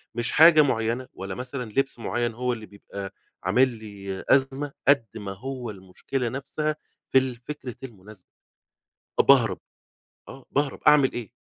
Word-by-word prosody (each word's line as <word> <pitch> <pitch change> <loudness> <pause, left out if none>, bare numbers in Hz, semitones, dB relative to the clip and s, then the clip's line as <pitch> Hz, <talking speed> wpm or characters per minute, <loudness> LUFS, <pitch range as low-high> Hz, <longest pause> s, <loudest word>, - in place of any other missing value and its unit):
مش 120 0 -1
حاجة 155 -1 +8
مُعيّنة، 120 -1 0
ولا 95 0 -6
مثلًا 125 -2 -6
لبسّ 135 0 -1
مُعيّن، 120 0 -1
هو 125 0 -1
اللي 110 -2 -7
بيبقى 100 -1 -9 0.3
عامل 125 +8 +4
لي 100 -4 -7
أزمة 135 +1 +2 0.2
قد 140 -5 +5
ما 100 -3 -5
هو 125 +3 -6
المشكلة 105 +6 -4
نفسها 150 +4 -3 0.4
في 135 - +5
الفكرة 130 0 -2
المناسبة، 105 -5 -12 0.9
أ - - +10
باهرب. - - +4 0.7
آه، 135 -1 -12
باهرب 145 -1 -1
أعمل 140 -3 +6
إيه؟ 120 -2 -6
125 Hz, 140 wpm, -25 LUFS, 105-135 Hz, 0.9 s, أ